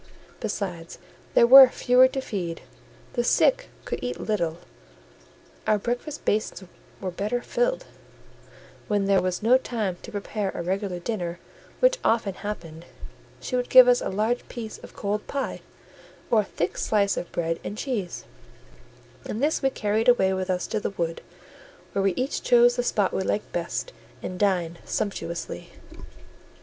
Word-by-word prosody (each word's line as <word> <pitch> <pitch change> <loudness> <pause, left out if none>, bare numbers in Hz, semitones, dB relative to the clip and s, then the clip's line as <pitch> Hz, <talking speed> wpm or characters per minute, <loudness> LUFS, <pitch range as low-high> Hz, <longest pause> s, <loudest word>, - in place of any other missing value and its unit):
Besides, 190 -7 -4 0.4
there - - +7
were 265 +1 +10
fewer 250 0 +5
to 265 +1 -4
feed; 175 -9 -4 0.5
the 240 - 0
sick - - +3 0.2
could - - -3
eat 250 - -3
little; 170 -7 -1 1.1
our 215 - +4
breakfast 245 +8 -4
basins 210 -2 -1 0.4
were 185 -2 -4
better 210 +7 -2
filled; - - 0 1.0
when 205 -2 +1
there 195 -1 +3
was 185 +2 -2
no 250 +4 +5
time 215 -8 -3
to - - -10
prepare 205 0 -3
a - - -3
regular 190 +1 -2
dinner, 175 -2 -3 0.4
which - - +4
often 225 -4 +1
happened, 170 -5 -7 0.5
she 255 - -4
would 250 0 -1
give 255 -1 +9
us 245 0 +4
a - - -2
large 220 +5 -1
piece 225 -3 -7
of - - -13
cold 205 +1 -3
pie, 280 -1 -3 0.7
or 225 -2 +5
a - - -7
thick 175 -2 -3
slice 200 -2 +2
of 175 - -5
bread 165 -1 -2
and 205 - -5
cheese, 220 -9 -3 1.0
and 215 - -4
this 305 +2 +1
we 270 - +3
carried 220 -1 +1
away 190 -6 +4
with 190 0 -3
us 180 -1 0
to 215 - -2
the - - -2
wood, 170 -4 -3 0.7
where 200 - +1
we 195 -2 +1
each 260 +3 -2
chose 240 0 +5
the - - +1
spot 205 -5 0
we - - 0
liked 205 +2 -2
best, 175 - -3 0.3
and 180 0 -5
dined 175 -4 +1
sumptuously. 170 -5 -4
210 Hz, 160 wpm, -25 LUFS, 185-245 Hz, 1.1 s, were